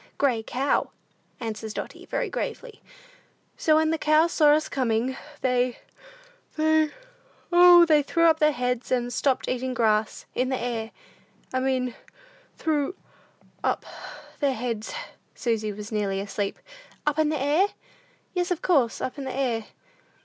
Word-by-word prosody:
"Gray 255 -5 +2
cow," 260 +5 0 0.5
answers 220 -2 -5
Dotty, - - -7
very - - -1
gravely. 485 -4 -5 0.7
"So 310 - +3
when 315 0 +3
the 325 - -1
cows 310 +3 +4
saw 300 -3 +5
us 310 +1 +1
coming, 250 0 0 0.3
they 250 -1 +1 0.8
they 315 0 +3 0.6
O, 350 0 +8
they 305 -3 +5
threw 335 +4 0
up 320 -1 +5
their 300 0 +5
heads, 250 -3 -2
and 245 -1 0
stopped 265 +1 +1
eating 255 0 -2
grass 215 -2 +1
in 255 +1 0
the 260 - 0
air. 235 -2 -3 0.6
I 260 - +1
mean 255 -2 0 0.6
threw 305 +2 0 0.7
up - - 0 0.5
their 280 -3 +1
heads." 225 -2 -3 0.4
Susy 220 -3 -1
was 210 +1 -8
nearly 200 -2 -1
asleep. 200 0 -3 0.5
"Up 300 +1 +1
in 310 -1 +3
the 305 -2 -1
air?" 295 +8 +3 0.7
"Yes, 360 0 0
of 360 -3 -2
course, 275 -10 +2
up 260 - -4
in 275 - -5
the 260 - -4
air. 235 -5 0
260 Hz, 145 wpm, -26 LUFS, 235-310 Hz, 0.8 s, O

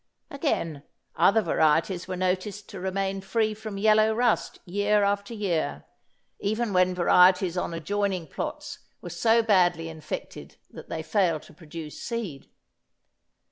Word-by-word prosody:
Again, 170 - -2 0.3
other 215 +2 +4
varieties 165 +2 +1
were 185 -1 -4
noticed 185 +3 -2
to 195 - -8
remain 195 +1 -2
free 215 +2 0
from 215 -1 -7
yellow 215 +1 +4
rust 240 0 +1
year 205 +3 +1
after 200 +1 0
year, 165 - -2 0.5
even 215 +1 -1
when 185 0 +3
varieties 180 0 +4
on 180 - -2
adjoining 185 +2 -2
plots 300 - -6 0.2
were 175 - -8
so 225 +6 +3
badly 175 -6 +2
infected 160 -1 -7
that - - -11
they 160 - -4
failed 165 -2 +1
to - - -16
produce 155 -1 -9
seed. 215 - -5
195 Hz, 135 wpm, -26 LUFS, 170-215 Hz, 0.5 s, other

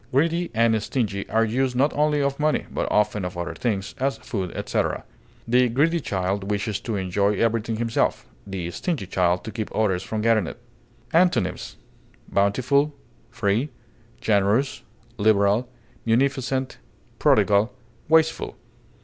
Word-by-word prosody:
Greedy 165 +6 +1
and 115 -1 +3
stingy 105 -4 -2
are 115 0 +3
used 125 +3 0
not 140 +4 +2
only 150 0 +2
of 140 0 -1
money, 150 0 +1
but - - -2
often 105 -1 +2
of 90 -1 -5
other 85 - -3
things, 100 -6 -2
as 135 +1 0
food, 95 -5 -4
etc. - - -1 0.4
The 125 +1 +4
greedy 155 +8 +2
child 95 - -2
wishes 105 0 -1
to 115 0 -4
enjoy 100 +2 +1
everything 115 +1 0
himself; 115 0 0 0.2
the 90 -3 -4
stingy 145 - -2
child, 90 -1 +1
to 110 - -6
keep 110 -2 -4
others 95 -5 +1
from 105 +2 -3
getting 110 -5 +3
it. - - -8 0.5
Antonyms: 145 - +2 0.5
bountiful, 130 +9 +2 0.3
free, 105 +8 0 0.5
generous, 105 +6 +1 0.4
liberal, 105 +2 +3 0.3
munificent, 130 +2 0 0.4
prodigal, 105 +3 +4 0.4
wasteful. 160 0 +2
115 Hz, 130 wpm, -24 LUFS, 100-135 Hz, 0.5 s, The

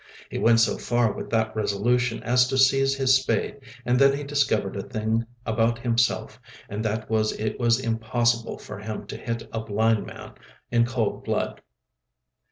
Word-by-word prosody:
He - - -3
went 115 0 +5
so 115 - +2
far 120 -2 +1
with - - -7
that 110 -1 0
resolution 115 +3 0
as 125 +2 +3
to 135 +1 -1
seize 135 +1 +4
his 135 -1 +3
spade, 130 +2 0 0.3
and 125 +1 +2
then 140 0 +5
he 145 - -5
discovered 140 -9 0
a - - -3
new - - -15
thing 110 -1 -1 0.2
about 115 +1 +1
himself, 115 -1 0 0.3
and 105 +2 -4
that 110 0 -2
was 110 -1 0
that 110 - -3
it 110 - -3
was 120 0 +3
impossible 115 0 0
for - - -9
him 105 +1 -6
to - - -7
hit 115 -1 -5
a 115 - -1
blind 110 0 +1
man - - -10 0.4
in 120 0 +3
cold 120 -3 -2
blood. - - -2
115 Hz, 180 wpm, -25 LUFS, 110-125 Hz, 0.4 s, went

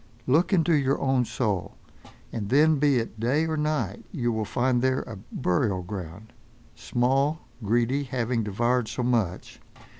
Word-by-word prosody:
Look 155 +10 +3
into 170 -3 +3
your 140 -2 +2
own 130 -2 +2
soul, 105 -8 -2 0.6
and 105 -3 -4
then, 150 +3 +4
be 145 -2 +3
it 115 -1 -3
day 135 +8 +1
or 160 -1 -1
night, 150 - -1
you 120 -1 -1
will 110 -1 -1
find 125 +3 +1
there 130 +1 +1
a 110 - -8 0.2
burial 95 -2 0
ground. 95 +2 -8 0.4
Small 135 +5 0 0.2
greedy, 120 +6 +1
having 120 -2 -1
devoured 120 +3 0
so 125 - -3
much! 115 -8 -1
125 Hz, 150 wpm, -26 LUFS, 110-140 Hz, 0.6 s, then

